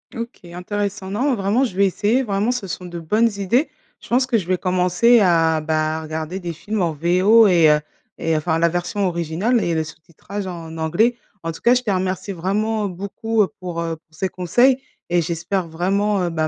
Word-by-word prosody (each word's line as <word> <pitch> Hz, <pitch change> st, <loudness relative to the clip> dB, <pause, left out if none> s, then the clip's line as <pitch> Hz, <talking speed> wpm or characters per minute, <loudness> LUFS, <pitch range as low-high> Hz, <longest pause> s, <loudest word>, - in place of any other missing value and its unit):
OK, 230 Hz, -4 st, -7 dB
intéressant. 200 Hz, +1 st, -4 dB
Non 255 Hz, +5 st, +1 dB
vraiment, 210 Hz, +6 st, +1 dB
je 225 Hz, -, -6 dB
vais 200 Hz, +1 st, +4 dB
essayer. 215 Hz, +7 st, +1 dB
Vraiment, 205 Hz, +1 st, 0 dB
ce 245 Hz, -5 st, -4 dB
sont 180 Hz, 0 st, -6 dB
de 175 Hz, -1 st, -6 dB
bonnes 215 Hz, +8 st, +2 dB
idées. 235 Hz, -, +1 dB, 0.3 s
Je -, -, -15 dB
pense 250 Hz, +2 st, +2 dB
que 250 Hz, -3 st, +1 dB
je 180 Hz, -, -4 dB
vais 185 Hz, 0 st, +1 dB
commencer 180 Hz, +6 st, +3 dB
à 165 Hz, -5 st, +3 dB
bah, 155 Hz, 0 st, -1 dB
regarder 160 Hz, +3 st, -5 dB
des 175 Hz, -2 st, -5 dB
films 210 Hz, +6 st, -3 dB
en 170 Hz, -3 st, 0 dB
VO 185 Hz, +8 st, +4 dB
et 170 Hz, -4 st, +5 dB
heu 150 Hz, 0 st, +4 dB, 0.4 s
et, 165 Hz, -, 0 dB
heu, -, -, +2 dB
enfin 160 Hz, +1 st, 0 dB
la 170 Hz, +1 st, +3 dB
version 175 Hz, +4 st, -2 dB
originale 175 Hz, +7 st, 0 dB
et 170 Hz, -, 0 dB
le 160 Hz, -, +1 dB
sous-titrage 170 Hz, +5 st, -8 dB
en 165 Hz, -2 st, -7 dB
anglais. 200 Hz, +10 st, +1 dB, 0.3 s
En 165 Hz, -, -2 dB
tout 165 Hz, -, -10 dB
cas, 240 Hz, -, +5 dB
je 250 Hz, -, +2 dB
te 230 Hz, -5 st, -1 dB
remercie 185 Hz, +1 st, -2 dB
vraiment, 205 Hz, +4 st, -1 dB
heu, -, -, 0 dB
beaucoup 200 Hz, +4 st, -1 dB
pour, 175 Hz, -2 st, -4 dB
heu, 165 Hz, -1 st, -3 dB
pour 160 Hz, 0 st, -26 dB
ces 190 Hz, +4 st, -2 dB
conseils 240 Hz, +10 st, +3 dB, 0.3 s
et 175 Hz, 0 st, +2 dB
j'espère 170 Hz, +2 st, -2 dB
vraiment, 195 Hz, +4 st, 0 dB
heu, 175 Hz, -, 0 dB
bah, 160 Hz, -2 st, -1 dB
185 Hz, 210 wpm, -21 LUFS, 165-210 Hz, 0.4 s, et